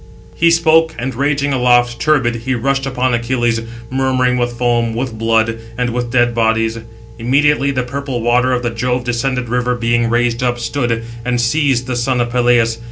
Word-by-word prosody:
He 170 - +3
spoke, 160 -1 +3
and 130 +2 -3
raging 140 +2 0
aloft, 120 -2 +2
turbid, 135 -6 +2
he 125 +3 -2
rushed 135 +3 -1
upon 130 -1 0
Achilles, 120 -1 0 0.3
murmuring 130 -1 +1
with 120 0 -1
foam, 120 -2 0
with 120 -1 -3
blood, 115 0 +1 0.2
and 125 -1 -1
with 120 0 -3
dead 120 0 +2
bodies. 115 0 0 0.4
Immediately 140 +4 +2
the 130 -2 -1
purple 135 0 -4
water 120 +2 +2
of 125 -1 -1
the 120 - -1
Jove 125 +2 -1
descended 125 +1 -2
river 125 +1 0
being 120 0 0
raised 120 0 0
up, 120 -1 0
stood, 120 -1 -2 0.2
and 125 0 -1
seized 130 0 +1
the 125 -1 -3
son 125 +1 0
of 120 0 -1
Peleus. 120 -2 +2
125 Hz, 175 wpm, -16 LUFS, 120-130 Hz, 0.4 s, He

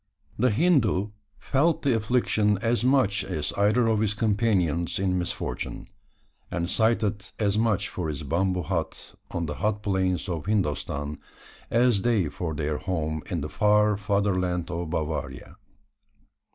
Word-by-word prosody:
The 125 +3 +4
Hindoo 110 - +2 0.3
felt 155 +4 +1
the 135 -5 +3
affliction 110 -2 +1
as 115 +2 0
much 125 -6 +3
as 75 -1 -3
either 105 +4 +3
of 110 -2 +2
his 105 -1 +1
companions 100 -6 +1
in 95 -1 0
misfortune; 90 - -4 0.6
and 85 -1 -2
sighed 110 +3 +2 0.3
as 105 -2 +1
much 110 -4 +1
for 90 -3 -4
his 75 -1 -4
bamboo 90 +4 0
hut 80 -1 -4 0.2
on 85 -1 -2
the 75 - -3
hot 105 +4 -1
plains 95 -2 0
of 85 -2 -4
Hindostan, 75 -7 -1 0.5
as 120 -3 +3
they 105 -9 +2
for 80 -1 -4
their 75 0 -2
home 80 -4 -2
in 85 -4 -2
the 75 - -4
far 105 0 +3
fatherland 95 -4 0
of 85 -1 -3
Bavaria. 80 0 -4
100 Hz, 140 wpm, -26 LUFS, 85-110 Hz, 0.6 s, The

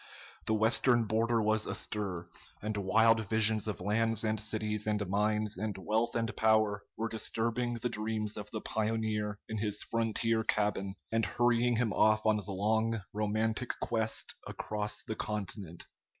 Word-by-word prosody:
The 110 - +3
Western 120 +2 +3
border 115 +1 +1
was 110 0 +1
astir, 95 -5 -2 0.3
and 105 +1 -3
wild 110 +3 +4
visions 110 -1 +4
of 105 -4 -3
lands 110 +3 0
and 110 -1 0
cities 105 0 -1
and 105 -2 0
mines 105 +1 +1
and 105 -1 -3
wealth 110 +4 0
and 115 -1 -1
power 110 -2 +3 0.2
were 115 - -1
disturbing 115 +2 -1
the 120 +1 -2
dreams 110 -2 -2
of 105 0 -7
the 110 - -5
pioneer 110 -1 -1
in 110 - -3
his 105 -1 -1
frontier 115 0 +1
cabin, 105 -3 0 0.2
and 115 0 +1
hurrying 120 0 +2
him 115 -3 +1
off 110 +1 +3
on 110 -1 +4
the 105 -1 -6
long, 110 +3 +1
romantic 110 +3 -1
quest 110 -1 0
across 105 0 -3
the 110 - -4
continent. 100 -5 -4
110 Hz, 150 wpm, -32 LUFS, 105-115 Hz, 0.3 s, wild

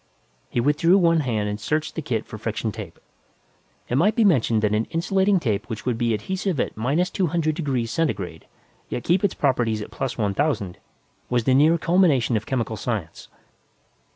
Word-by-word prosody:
He - - -1
withdrew 150 +8 +4
one 165 -3 +4
hand 115 -7 -1
and 105 0 -3
searched 155 +4 -1
the 160 - -4
kit 115 -6 -2
for 110 - -9
friction 110 0 -2
tape. - - -9 0.9
It 125 - +1
might 205 +6 +3
be 230 - +3
mentioned 120 - +3
that 105 -1 +2
an 110 +2 +1
insulating 190 +3 +1
tape 110 -10 -2
which 110 -2 -6
would 120 -3 -1
be 120 -1 +1
adhesive 185 - -2
at - - -1
minus 145 +11 0
two 185 - 0
hundred 160 -1 0
degrees 135 -8 -2
centigrade 95 - -2 0.4
yet 120 - -4
keep 175 +3 +2
its 200 - +1
properties 120 -6 +1
at 105 - -7
plus 135 -2 -4
one 105 -4 0
thousand, 110 - -1 0.5
was 120 -1 +1
the 130 - +3
near 155 +5 +5
culmination 165 -9 +3
of 110 0 -2
chemical 115 -4 -2
science. 105 -10 -4
130 Hz, 185 wpm, -23 LUFS, 110-165 Hz, 0.9 s, near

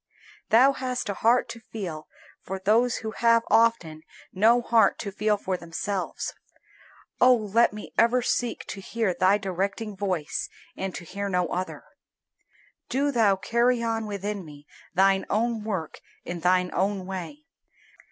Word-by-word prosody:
Thou 250 +5 +6
hast 255 -4 -3
a - - 0
heart 235 +5 +2
to 230 - -7
feel 185 -9 -7 0.3
for 190 - -5
those 225 +6 +2
who 220 - -2
have 230 0 +3
often 225 -9 +2 0.3
no 225 +5 +4
heart 230 -1 +3
to 200 - -5
feel 210 +1 +1
for 190 -2 -3
themselves. 180 +3 -4 0.9
Oh 250 0 +7
let 225 +1 +2
me 210 0 -9
ever 235 +2 +4
seek 245 -1 -1
to 195 - -6
hear 220 -1 -1
Thy 185 +3 +3
directing 195 +2 -3
voice 185 -6 -2 0.3
and 190 -1 -4
to - - -7
hear 200 +3 -4
no 180 -2 +1
other. 185 +1 -4 1.1
Do 280 +3 +1
Thou 220 -6 +3
carry 235 +5 +1
on 225 -1 -1
within 205 -1 -4
me 145 -2 -13 0.3
Thine 195 +1 +4
own 225 +1 0
work 190 -8 -4 0.3
in 175 0 -5
thine 180 +1 +2
own 195 0 -1
way. 190 - -7
205 Hz, 150 wpm, -26 LUFS, 185-230 Hz, 1.1 s, Oh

